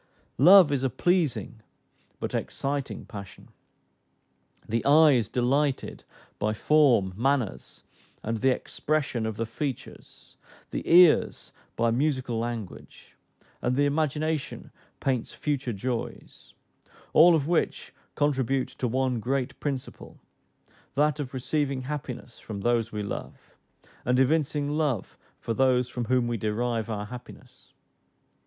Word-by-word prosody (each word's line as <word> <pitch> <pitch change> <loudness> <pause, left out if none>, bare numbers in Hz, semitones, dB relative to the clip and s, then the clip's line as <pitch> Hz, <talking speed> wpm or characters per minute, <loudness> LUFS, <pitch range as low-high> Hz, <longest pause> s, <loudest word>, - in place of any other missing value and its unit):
Love 180 +1 +8
is 140 -2 0
a 135 - +1
pleasing 155 -6 0 0.6
but - - -4
exciting 140 0 -3
passion. 100 -3 -10 1.2
The 115 +1 -1
eye 150 +2 +6
is 120 -6 +2
delighted 135 +3 0 0.3
by 110 +1 0
form, 125 -9 +3
manners, 125 -1 -1 0.4
and 115 +1 -2
the 135 - +3
expression 130 -3 -1
of 110 - -4
the 115 - -1
features, 130 +3 -7 0.3
the - - -3
ears 175 -2 +5 0.2
by 115 0 +1
musical 130 -2 0
language, 115 -4 -7 0.5
and 125 +1 0
the 145 +2 +3
imagination 150 0 -2 0.3
paints 130 -4 -1
future 140 -4 -2
joys; 115 +3 -6 0.6
all 170 +2 +7
of 150 -2 0
which 170 -1 -1 0.2
contribute 135 -3 0
to 125 - -3
one 130 0 0
great 130 +3 -2
principle, 135 -3 -6 0.8
that 150 +1 +2
of 140 -3 -4
receiving 135 0 -2
happiness 130 -4 -6
from 100 -3 -7
those 120 0 +1
we 105 -1 -4
love, 100 - -7 0.5
and 125 +1 +1
evincing 145 +1 +1
love 150 -8 -1 0.2
for 115 - -3
those 125 0 +2
from 120 -1 -4
whom 125 0 +2
we 120 -1 -1
derive 115 +2 -2
our 105 -2 -3
happiness. 125 +3 -12
130 Hz, 120 wpm, -27 LUFS, 115-145 Hz, 1.2 s, Love